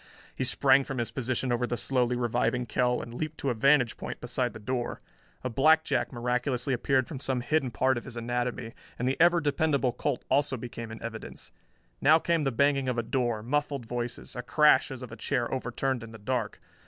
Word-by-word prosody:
He -, -, -3 dB
sprang 135 Hz, +1 st, +4 dB
from 135 Hz, 0 st, -5 dB
his 115 Hz, -2 st, -2 dB
position 130 Hz, 0 st, -2 dB
over 120 Hz, 0 st, +1 dB
the 120 Hz, -, -2 dB
slowly 125 Hz, -1 st, +1 dB
reviving 120 Hz, +1 st, 0 dB
Kell 125 Hz, +2 st, 0 dB
and 115 Hz, -, -9 dB
leaped 155 Hz, +4 st, -4 dB
to 135 Hz, -, -1 dB
a -, -, 0 dB
vantage 125 Hz, +1 st, +3 dB
point -, -, -6 dB
beside 125 Hz, 0 st, -1 dB
the 110 Hz, -, -9 dB
door. 120 Hz, +3 st, -3 dB, 0.4 s
A -, -, -1 dB
blackjack 135 Hz, -1 st, +3 dB
miraculously 125 Hz, +1 st, -1 dB
appeared 130 Hz, +1 st, +1 dB
from 140 Hz, -, -6 dB
some 130 Hz, -2 st, -1 dB
hidden 135 Hz, +1 st, +1 dB
part 130 Hz, +2 st, +1 dB
of -, -, -16 dB
his 120 Hz, -1 st, -8 dB
anatomy 120 Hz, 0 st, -2 dB, 0.2 s
and 125 Hz, -, -1 dB
the 130 Hz, -, +1 dB
ever 175 Hz, 0 st, +6 dB
dependable 145 Hz, -4 st, +1 dB
Colt 120 Hz, -, -2 dB
also 140 Hz, -2 st, +2 dB
became 115 Hz, -1 st, -7 dB
in 110 Hz, -, -9 dB
evidence. 115 Hz, -1 st, -8 dB, 0.5 s
Now 155 Hz, +3 st, +7 dB
came 165 Hz, -2 st, 0 dB
the 135 Hz, -, +1 dB
banging 140 Hz, +1 st, +2 dB
of 125 Hz, -, -1 dB
a 120 Hz, -, 0 dB
door, 120 Hz, -3 st, -1 dB
muffled 140 Hz, 0 st, -1 dB
voices, 120 Hz, 0 st, -5 dB
a 125 Hz, -, -3 dB
crash 150 Hz, +5 st, +4 dB
as 130 Hz, -2 st, -7 dB
of 125 Hz, -, -8 dB
a -, -, -7 dB
chair 120 Hz, +2 st, -1 dB
overturned 130 Hz, 0 st, -2 dB
in 115 Hz, 0 st, -10 dB
the -, -, -8 dB
dark. 110 Hz, 0 st, -2 dB
125 Hz, 205 wpm, -28 LUFS, 120-135 Hz, 0.5 s, Now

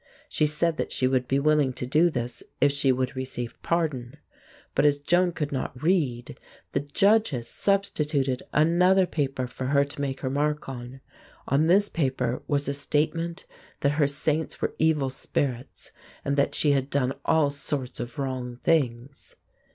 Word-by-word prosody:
She 150 Hz, -, +1 dB
said 160 Hz, +2 st, 0 dB
that -, -, -2 dB
she 130 Hz, -, +1 dB
would 130 Hz, -1 st, +1 dB
be 135 Hz, -, +1 dB
willing 150 Hz, -2 st, +2 dB
to 125 Hz, -, -4 dB
do 155 Hz, +7 st, +4 dB
this 125 Hz, -5 st, -4 dB, 0.2 s
if 145 Hz, +1 st, +4 dB
she 140 Hz, -1 st, +2 dB
would 130 Hz, +1 st, -1 dB
receive 130 Hz, -2 st, -5 dB
pardon. 150 Hz, -6 st, -1 dB, 0.6 s
But -, -, +2 dB
as 145 Hz, -1 st, +4 dB
Joan 175 Hz, +5 st, +2 dB
could 150 Hz, -3 st, -3 dB
not 130 Hz, -2 st, -4 dB
read, 140 Hz, -8 st, 0 dB, 0.3 s
the -, -, +1 dB
judges 145 Hz, -, +2 dB
substituted 150 Hz, -9 st, 0 dB
another 180 Hz, +5 st, +4 dB
paper 135 Hz, -6 st, -2 dB
for 130 Hz, +1 st, -6 dB
her 140 Hz, +1 st, +3 dB
to 140 Hz, 0 st, -7 dB
make 135 Hz, -1 st, -3 dB
her 130 Hz, -, -1 dB
mark 150 Hz, +2 st, -1 dB
on. 130 Hz, 0 st, -8 dB, 0.5 s
On 145 Hz, +3 st, +3 dB
this 200 Hz, +4 st, +4 dB
paper 130 Hz, -7 st, -1 dB
was 145 Hz, -1 st, 0 dB
a 140 Hz, -, 0 dB
statement 160 Hz, +5 st, -1 dB, 0.4 s
that 140 Hz, -, +3 dB
her 145 Hz, -, +5 dB
saints 150 Hz, +2 st, -1 dB
were -, -, -1 dB
evil 150 Hz, -4 st, +2 dB
spirits, 130 Hz, -1 st, -3 dB, 0.3 s
and 140 Hz, -, +1 dB
that 140 Hz, 0 st, +1 dB
she 150 Hz, -, +3 dB
had 135 Hz, -1 st, +1 dB
done 135 Hz, -2 st, +1 dB
all 155 Hz, -3 st, +3 dB
sorts 140 Hz, -2 st, -4 dB
of 120 Hz, 0 st, -6 dB
wrong 130 Hz, -3 st, -3 dB
things. 135 Hz, -4 st, -1 dB
140 Hz, 165 wpm, -26 LUFS, 130-155 Hz, 0.6 s, her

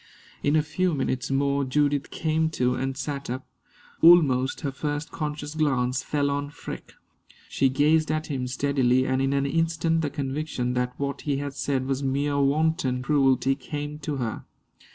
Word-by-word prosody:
In 145 Hz, +1 st, +2 dB
a 155 Hz, -, +4 dB
few 175 Hz, +3 st, 0 dB
minutes 130 Hz, -2 st, -2 dB
more 140 Hz, +1 st, +1 dB
Judith 145 Hz, +2 st, +1 dB
came 160 Hz, 0 st, 0 dB
to 125 Hz, 0 st, +2 dB
and 135 Hz, +1 st, -3 dB
sat 140 Hz, -1 st, -4 dB
up. 130 Hz, +2 st, -4 dB, 0.6 s
Almost 140 Hz, -7 st, +5 dB
her 140 Hz, -3 st, -2 dB
first 145 Hz, +3 st, -3 dB
conscious 150 Hz, -1 st, -4 dB
glance 130 Hz, -5 st, +1 dB
fell 145 Hz, -1 st, 0 dB
on 145 Hz, 0 st, -2 dB
Freke. 145 Hz, -, -9 dB, 0.5 s
She 135 Hz, -, +2 dB
gazed 150 Hz, +4 st, +3 dB
at 155 Hz, 0 st, -1 dB
him 130 Hz, -5 st, -3 dB
steadily, 130 Hz, -1 st, +2 dB
and 130 Hz, 0 st, +1 dB
in 135 Hz, 0 st, +1 dB
an 140 Hz, 0 st, +1 dB
instant 165 Hz, +2 st, +1 dB
the 150 Hz, -, -1 dB
conviction 135 Hz, -3 st, -2 dB
that 125 Hz, 0 st, -2 dB
what 140 Hz, 0 st, -3 dB
he 145 Hz, -2 st, -1 dB
had 140 Hz, 0 st, -4 dB
said 135 Hz, -2 st, -1 dB
was 135 Hz, 0 st, -1 dB
mere 140 Hz, +1 st, 0 dB
wanton 140 Hz, -2 st, +1 dB
cruelty 135 Hz, -2 st, +3 dB
came 145 Hz, +2 st, -6 dB
to 150 Hz, -1 st, -3 dB
her. 120 Hz, -5 st, -3 dB
140 Hz, 170 wpm, -26 LUFS, 130-150 Hz, 0.6 s, Almost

